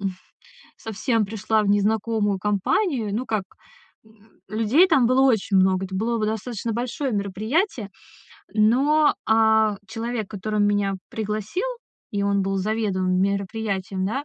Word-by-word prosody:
м 195 - 0
ф 185 - -15 0.6
совсем 225 +1 -1
пришла 215 +1 0
в 205 - -1
незнакомую 205 0 +1
компанию. 210 - 0
Ну, 250 +4 -2
как, 215 -5 -2 0.6
м 220 0 -25
людей 225 - +3
там 270 -9 +4
было 255 +2 +3
очень 220 -7 +2
много, 190 0 +3
это 190 - -8
было 230 +4 -1
во 215 - 0
достаточно 220 +1 -3
большое 245 +3 -3
мероприятие. 215 - -1 0.6
Но, 275 +8 +4
а, 220 -1 +3
человек, 225 0 -4
который 210 +1 -2
меня 205 -1 +1 0.2
пригласил, 215 - -3 0.4
и 200 -1 -2
он 200 0 +1
был 195 0 -1
заведуемым 190 -3 0
мероприятием, 200 -1 -2
да, 270 +7 -2
215 Hz, 140 wpm, -23 LUFS, 200-230 Hz, 0.6 s, там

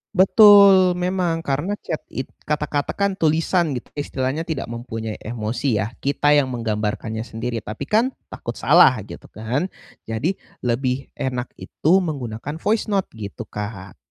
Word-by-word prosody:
Betul, 195 -1 +7
memang, 180 -2 -1
karena 150 +9 -1
chat 160 - -3
it 130 - -6 0.2
kata-kata 150 -1 -1
kan 200 0 +1
tulisan 160 0 +2
gitu, 125 - -7
istilahnya 145 +2 -3
tidak 150 -7 -3
mempunyai 115 -2 -5
emosi 115 +3 -2
ya. 110 - -5
Kita 145 +1 +1
yang 145 -3 +4
menggambarkannya 110 -1 -3
sendiri, 115 +1 -4
tapi 105 0 -6
kan 235 +5 +2 0.2
takut - - -6
salah, - - +6
gitu - - -11
kan. 120 - -2 0.4
Jadi 125 - -2 0.2
lebih 125 +2 -1
enak 125 -1 -3
itu 160 - -1
menggunakan 140 -4 -4
voice 215 +7 0
note 200 -3 -1
gitu, 105 -3 -7
Kak. 100 -2 -7
140 Hz, 140 wpm, -22 LUFS, 115-175 Hz, 0.4 s, Betul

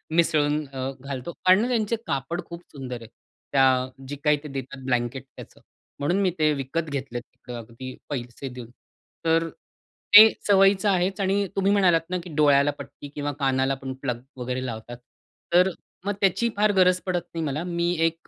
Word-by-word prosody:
मिसळून 150 -2 +2
अ, 135 0 -4
घालतो 140 +4 -5
आणि 195 +6 +6
त्यांचे 230 -2 0
कापड 140 +6 -2
खूप 170 0 -9
सुंदर 125 -4 -7
आहे. 115 - -10 0.4
त्या 130 -1 +3 0.2
जी 145 - -5
काही 150 -1 +4
ते - - -6
देतात 135 -1 -7
ब्लँकेट 125 +1 -1
त्याचं, - - -12 0.4
म्हणून 175 +7 +1
मी 190 - +3
ते 155 -1 +4
विकत 145 +4 -3
घेतले 135 -4 -4
तिकडं 120 0 -12
अगदी 115 +3 -9
पैसे 125 0 -5
देऊन. 125 -2 -9 0.6
तर 165 0 +2 0.7
ते 220 +1 +12 0.2
सवयीचं 195 0 +5
आहेच 190 +1 +1
आणि 195 +1 +1
तुम्ही 195 +1 +2
म्हणालात 180 -5 +4
ना 185 - -1
की 180 - -10
डोळ्याला 145 -1 +4
पट्टी 140 +1 -10
किंवा 145 0 -2
कानाला 135 0 +1
पण 135 -1 -6
प्लग 125 -3 -3 0.2
वगैरे 125 +1 -3
लावतात? 115 0 -6 0.6
तर 180 +2 +6 0.4
मग 205 - 0
त्याची 200 +5 +2
फार 210 0 +4
गरज 185 -1 +4
पडत 180 -2 0
नाही 165 -1 -2
मला. 150 +4 -2
मी 170 0 -1
एक 165 0 0
145 Hz, 170 wpm, -25 LUFS, 130-180 Hz, 0.7 s, ते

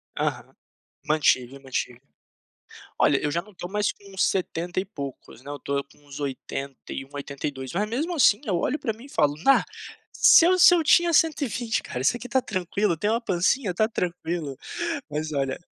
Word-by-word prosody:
Aham, - - -3 0.5
mantive, 140 -4 +2
mantive. 125 -2 -4 1.0
Olha, 140 - +4
eu 150 - -1
já 170 - 0
não 210 +2 -18
tô 175 - -7
mais 210 +2 0
com 200 -1 -16
70 180 -2 0
e 190 - -2
poucos, 140 - -8
né, 140 - -10
eu 145 - -6
tô 140 +1 -2
com 140 - -24
uns 145 0 -10
81, 135 -1 -6
82, 140 -2 -5
mas 210 +4 -1
mesmo, 300 +10 -2
assim, 225 -6 +5
eu 190 - 0
olho 255 - 0
pra 225 - -2
mim 230 +4 -14
e 280 - -14
falo: 145 - +1
Na, 275 - +5 0.5
se 330 - +7
eu 370 +1 +4
se 355 - +9
eu 335 - +1
tinha 345 +2 +5
120 270 - +1
cara, 125 - -5
isso 135 - +3
aqui 245 +1 -8
tá 260 +2 +2
tranquilo, 185 -2 -1
tem 205 +7 -1
uma 230 +2 +1
pancinha, 195 +1 +1
tá 215 +5 +2
tranquilo", 170 - -3 0.5
mas 155 +1 -3
olha 135 -2 -1
175 Hz, 185 wpm, -25 LUFS, 140-225 Hz, 1.0 s, se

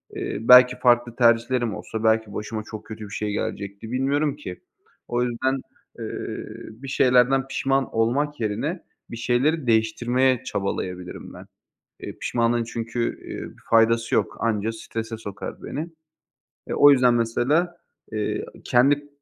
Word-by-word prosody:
eee, - - -3
belki 125 +1 +8
farklı 120 -1 +3
tercihlerim 120 -1 +2
olsa 110 0 -6
belki 110 -1 +2
başıma 110 +1 -4
çok 110 -1 -7
kötü 110 -1 -8
bir - - -11
şey 105 0 -2
gelecekti, 100 +2 -4
bilmiyorum 140 +3 +1
ki. 90 -12 -8 0.5
O 120 0 0
yüzden, 130 +2 0 0.4
eee, - - -4 0.7
bir 125 +5 -11
şeylerden 130 +1 +3
pişman 135 0 0
olmak 140 +6 +1
yerine, 115 - -2 0.3
bir 115 - -6
şeyleri 130 +5 +1
değiştirmeye 120 +3 +2
çabalayabilirim 90 -2 -4
ben. - - -11 0.5
Eee, - - -8
pişmanlığın 120 0 +1
çünkü, 115 +1 -4 0.2
eee, - - -6
bir - - -20
faydası 115 0 +3
yok, - - 0
anca 110 -1 0
strese 115 0 -6
sokar 100 -3 -7
beni. 155 +4 -4 0.8
Eee, - - -2
o 145 - +8
yüzden 125 -3 +5
mesela, 135 +10 +1 0.4
eee, 105 -1 -2 0.2
kendi 145 +4 +3
120 Hz, 135 wpm, -24 LUFS, 110-130 Hz, 0.8 s, belki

